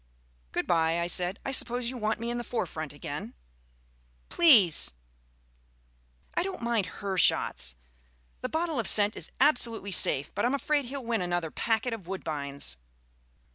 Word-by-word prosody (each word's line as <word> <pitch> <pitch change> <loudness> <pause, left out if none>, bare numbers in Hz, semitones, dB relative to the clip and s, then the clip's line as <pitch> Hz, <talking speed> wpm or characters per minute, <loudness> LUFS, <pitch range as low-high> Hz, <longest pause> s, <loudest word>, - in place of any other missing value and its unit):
"Good - - -2
bye," 165 -1 +2
I 170 - 0
said; 180 +2 -1
"I 270 - -2
suppose 245 -2 0
you - - -8
want 220 -2 -1
me 235 +1 -3
in 240 - -3
the - - -4
forefront 160 - -4
again?" 145 -4 -7 0.9
"Please." 225 - +5 1.4
"I - - +1
don't 375 -8 -5
mind 230 -5 0
her 190 +2 -3
shots 60 - +2 0.7
the 255 - -3
bottle 320 -2 -1
of 225 - 0
scent 210 0 +4
is - - -6
absolutely 230 -8 +3
safe; 140 -5 +2
but - - -2
I'm 250 +4 +2
afraid 290 0 0
he'll 265 0 -6
win 230 -3 0
another 175 -3 -2
packet 225 +1 0
of 200 -6 -8
woodbines." 140 - -5
215 Hz, 155 wpm, -28 LUFS, 170-245 Hz, 1.4 s, Please